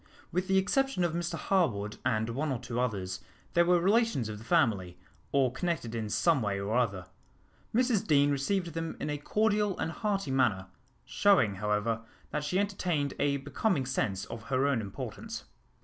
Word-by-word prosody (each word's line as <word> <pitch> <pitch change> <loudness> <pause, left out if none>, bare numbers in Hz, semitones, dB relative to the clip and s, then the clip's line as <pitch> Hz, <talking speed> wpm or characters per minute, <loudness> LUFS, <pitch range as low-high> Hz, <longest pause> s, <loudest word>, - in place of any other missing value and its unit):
With 180 +2 -1
the 190 -1 +3
exception 270 +2 +1
of 170 -2 +1
Mr 170 0 -2
Harwood 110 - 0
and 110 -3 +1
one 145 +5 -1
or 130 - 0
two 120 +1 -4
others, 100 -7 -2 0.3
they 170 - +5
were 175 0 +4
relations 200 - +2
of 105 -1 -6
the - - -11
family, 110 - +1 0.3
or 135 -3 +3
connected 160 -5 -2
in 110 -2 -3
some 160 +4 +3
way 100 -2 -1
or 100 +3 -2
other. 100 -7 0 0.7
Mrs 235 -3 +2
Deane 145 -2 +4
received 170 +5 0
them 165 0 -4
in 150 - -2
a 150 - -3
cordial 210 +3 +1
and 165 - -2
hearty 195 -7 -1
manner, 110 -8 +2 0.4
showing, 175 - +4
however, 105 +2 0 0.3
that 150 - -2
she 150 +5 0
entertained 180 -8 0
a 140 -1 +2
becoming 140 +1 0
sense 95 -7 -1
of 115 -1 -8
her 130 +2 +1
own 140 -5 +2
importance. 100 -2 -6
140 Hz, 175 wpm, -30 LUFS, 115-180 Hz, 0.7 s, they